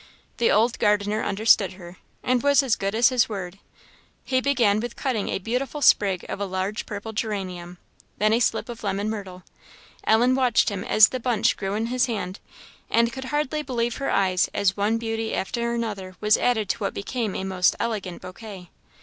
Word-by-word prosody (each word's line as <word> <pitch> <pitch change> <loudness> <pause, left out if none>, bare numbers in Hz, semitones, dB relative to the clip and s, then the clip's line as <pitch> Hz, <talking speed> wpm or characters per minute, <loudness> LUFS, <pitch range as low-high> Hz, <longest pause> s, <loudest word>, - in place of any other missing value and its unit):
The 235 - +2
old 230 +3 +2
gardener 210 0 +1
understood 200 -2 +3
her, 175 -1 -12 0.3
and 250 -1 +1
was 285 +1 +4
as 245 -4 +2
good 195 +2 -3
as 235 +3 +5
his 250 -3 +2
word. 195 -2 -6 0.6
He 260 -1 0
began 240 -7 +2
with 240 +1 -5
cutting 250 -7 -2
a - - -1
beautiful 255 +8 -3
sprig 190 -3 +4
of - - -5
a 200 - -1
large 190 +3 -3
purple 210 +2 -6
geranium, 185 -5 -4 0.4
then 215 +2 +2
a 230 - +3
slip 225 -2 0
of 240 -2 -8
lemon 200 +1 -1
myrtle. 190 -4 -7 0.6
Ellen 240 +4 +4
watched 255 -3 +3
him 200 -3 -4
as 215 0 +6
the 255 - -4
bunch 230 -2 +1
grew 195 0 -3
in 220 +2 -1
his 250 +1 +1
hand, 200 -5 -4 0.5
and 235 0 +2
could 265 0 -6
hardly 295 +1 -1
believe 240 -4 -2
her 275 - -2
eyes 185 -2 +2
as 200 -2 +2
one 210 +3 +1
beauty 225 -1 -3
after 235 +4 -2
another 205 -6 -4
was 210 0 +4
added 220 -4 +1
to - - 0
what 200 - -3
became 215 0 -3
a - - -3
most 185 -1 +2
elegant 210 -6 -3
bouquet. 185 -1 -10
215 Hz, 190 wpm, -24 LUFS, 195-240 Hz, 0.6 s, as